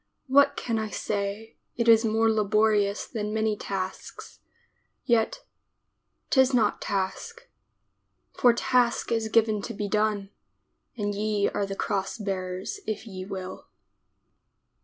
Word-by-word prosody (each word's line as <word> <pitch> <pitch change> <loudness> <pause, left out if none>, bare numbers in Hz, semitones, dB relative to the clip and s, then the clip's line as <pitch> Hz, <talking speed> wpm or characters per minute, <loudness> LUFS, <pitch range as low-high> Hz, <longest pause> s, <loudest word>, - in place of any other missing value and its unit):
What 280 +1 +4
can 230 -2 -2
I 220 -1 -3
say 205 +2 -4
— - - -51
it 235 -1 0
is 225 0 +7
more 225 0 +2
laborious 210 -1 +2
than 210 -3 -4
many 220 -1 +1
tasks, 190 -2 -6 0.7
Yet 240 - +1 0.4
— - - -51
'tis 265 -1 +4
not 220 -4 +2
task 215 - -3 0.4
— - - -49
For 245 - +7
task 240 0 +1
is 225 -1 0
given 220 -2 +3
to - - -6
be 205 0 -3
done 210 -1 0 0.7
And 205 -2 -1
ye 205 0 0
are 200 - -2
the 195 - -4
cross 195 +1 -2
bearers 190 - -4
if 215 +1 -3
ye 185 -4 -7
will. 190 -2 -7
215 Hz, 135 wpm, -27 LUFS, 200-230 Hz, 0.7 s, is